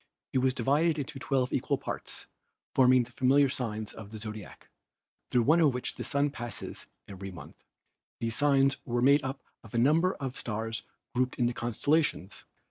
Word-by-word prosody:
It 130 Hz, -, +3 dB
was 130 Hz, 0 st, +2 dB
divided 150 Hz, +6 st, +2 dB
into 145 Hz, -1 st, -5 dB
twelve 130 Hz, -1 st, 0 dB
equal -, -, +1 dB
parts, -, -, -6 dB, 0.5 s
forming 130 Hz, -1 st, +5 dB
the 120 Hz, -, -12 dB
familiar 135 Hz, +3 st, +4 dB
signs 110 Hz, -4 st, -3 dB
of 110 Hz, -2 st, -10 dB
the 110 Hz, -, -8 dB
zodiac, 110 Hz, -2 st, -8 dB, 0.6 s
through 120 Hz, -, +3 dB
one 155 Hz, +7 st, +5 dB
of 150 Hz, -6 st, +4 dB
which 125 Hz, 0 st, -3 dB
the -, -, -6 dB
Sun 140 Hz, 0 st, +1 dB
passes 120 Hz, -4 st, -6 dB, 0.2 s
every 95 Hz, 0 st, -7 dB
month. 90 Hz, -3 st, -12 dB, 0.6 s
These 115 Hz, -1 st, -1 dB
signs 140 Hz, -1 st, +3 dB
were 120 Hz, 0 st, -1 dB
made 140 Hz, +2 st, +5 dB
up 135 Hz, 0 st, -4 dB, 0.2 s
of 115 Hz, 0 st, -11 dB
a -, -, +2 dB
number 160 Hz, +9 st, +3 dB
of 135 Hz, -2 st, -5 dB
stars 110 Hz, 0 st, -3 dB, 0.3 s
grouped 125 Hz, +1 st, 0 dB
into 120 Hz, -1 st, +1 dB
constellations. 120 Hz, -, 0 dB
125 Hz, 170 wpm, -29 LUFS, 115-140 Hz, 0.6 s, forming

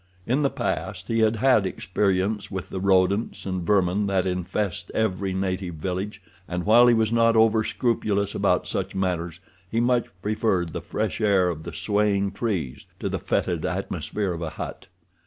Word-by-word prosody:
In 130 Hz, +5 st, +1 dB
the 140 Hz, -, +3 dB
past 95 Hz, -6 st, -3 dB
he 115 Hz, 0 st, +1 dB
had 110 Hz, 0 st, +3 dB
had 110 Hz, -4 st, +3 dB
experience 95 Hz, +2 st, -1 dB
with 95 Hz, -2 st, -5 dB
the 95 Hz, -, -4 dB
rodents 95 Hz, +3 st, +2 dB
and 95 Hz, -2 st, -2 dB
vermin 100 Hz, +1 st, +2 dB
that 95 Hz, -1 st, +1 dB
infest 90 Hz, 0 st, -2 dB
every 100 Hz, -3 st, 0 dB
native 95 Hz, -2 st, -2 dB
village, 95 Hz, +5 st, -4 dB, 0.2 s
and, 90 Hz, 0 st, -3 dB
while 120 Hz, +3 st, +7 dB
he 120 Hz, -, +6 dB
was 110 Hz, -1 st, +2 dB
not 115 Hz, 0 st, +4 dB
overscrupulous 110 Hz, -2 st, +2 dB
about -, -, +1 dB
such -, -, -3 dB
matters, 90 Hz, -3 st, -2 dB, 0.3 s
he 115 Hz, -, 0 dB
much 120 Hz, 0 st, +2 dB, 0.2 s
preferred 105 Hz, -5 st, 0 dB
the -, -, -4 dB
fresh -, -, -3 dB
air 100 Hz, -4 st, +3 dB
of 80 Hz, -3 st, -4 dB
the -, -, -7 dB
swaying 100 Hz, -1 st, +1 dB
trees 95 Hz, -, -3 dB
to -, -, -2 dB
the -, -, -2 dB
fetid -, -, -1 dB
atmosphere 100 Hz, -4 st, -2 dB
of 85 Hz, -, -6 dB
a 80 Hz, -, -2 dB
hut. -, -, -7 dB
100 Hz, 170 wpm, -25 LUFS, 90-110 Hz, 0.3 s, while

